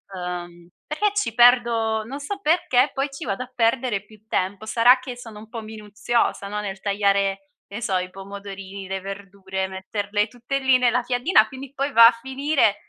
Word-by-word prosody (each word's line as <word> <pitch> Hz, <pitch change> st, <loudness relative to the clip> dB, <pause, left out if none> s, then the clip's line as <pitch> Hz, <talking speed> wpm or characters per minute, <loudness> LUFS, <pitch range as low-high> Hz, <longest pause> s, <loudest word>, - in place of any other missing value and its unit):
Ehm, 175 Hz, -1 st, -6 dB, 0.2 s
perché 410 Hz, +8 st, 0 dB
ci 320 Hz, -, 0 dB
perdo 235 Hz, -2 st, +4 dB
non 270 Hz, +5 st, -6 dB
so 395 Hz, +8 st, -5 dB
perché, 300 Hz, -6 st, +3 dB
poi 275 Hz, +1 st, -1 dB
ci 275 Hz, -, -7 dB
vado 200 Hz, +6 st, -2 dB
a 255 Hz, -, -15 dB
perdere 230 Hz, -3 st, +1 dB
più 215 Hz, -1 st, -19 dB
tempo. 200 Hz, +1 st, -2 dB
Sarà 240 Hz, +3 st, +5 dB
che 255 Hz, -1 st, -8 dB
sono 225 Hz, -4 st, -10 dB
un 220 Hz, -, -13 dB
po' 230 Hz, -1 st, -6 dB
minuziosa, 215 Hz, 0 st, -2 dB
no, 210 Hz, +1 st, -3 dB
nel 195 Hz, -1 st, -5 dB
tagliare, 195 Hz, -1 st, +1 dB, 0.2 s
che -, -, -7 dB
ne 235 Hz, -, -6 dB
so, 195 Hz, -4 st, -1 dB
i 180 Hz, 0 st, -3 dB
pomodorini, 195 Hz, 0 st, -9 dB
le 190 Hz, 0 st, -2 dB
verdure, 195 Hz, -1 st, -5 dB
metterle 205 Hz, +2 st, -2 dB
tutte 245 Hz, +4 st, -4 dB
lì 265 Hz, -1 st, +4 dB
nella 245 Hz, 0 st, +2 dB
piadina 245 Hz, -1 st, +3 dB
quindi, 265 Hz, +2 st, -9 dB
poi, 275 Hz, +1 st, -2 dB
va 230 Hz, 0 st, +10 dB
a -, -, +6 dB
finire 265 Hz, -4 st, +1 dB
220 Hz, 185 wpm, -23 LUFS, 195-250 Hz, 0.2 s, va